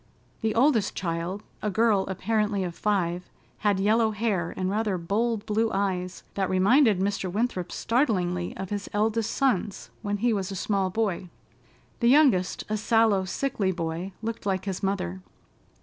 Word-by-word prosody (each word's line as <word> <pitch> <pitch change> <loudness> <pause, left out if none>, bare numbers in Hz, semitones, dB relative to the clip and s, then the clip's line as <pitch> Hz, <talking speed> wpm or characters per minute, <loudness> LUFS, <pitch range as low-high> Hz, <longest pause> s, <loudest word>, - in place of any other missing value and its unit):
The 220 -1 0
oldest 235 -4 +3
child, 175 +3 -3 0.2
a 210 - 0
girl 210 -1 +2
apparently 205 +1 0
of 175 -2 -3
five, 180 -3 -1 0.3
had 205 -2 +2
yellow 220 +3 +3
hair 205 -5 -1
and 185 - -1
rather 205 0 0
bold 210 +5 -1
blue 220 +1 +1
eyes 185 -2 -2
that 190 -2 -1
reminded 210 +4 +4
Mr. 195 -1 -1
Winthrop 200 -4 -1
startlingly 180 -8 0
of 190 0 -6
his 205 -1 -3
eldest 220 +1 +1
son's 210 -8 -1
when 205 -1 -2
he 235 +3 +2
was 195 -2 -2
a 195 - -5
small 195 0 0
boy. 190 -3 -1 0.7
The 235 - +3
youngest, 255 -11 +4
a 215 - -1
sallow, 215 -3 +3
sickly 195 -1 -1
boy, 170 +1 -4
looked 230 0 -4
like 190 -1 -1
his 190 -2 -3
mother. 95 - -2
200 Hz, 155 wpm, -26 LUFS, 185-225 Hz, 0.7 s, reminded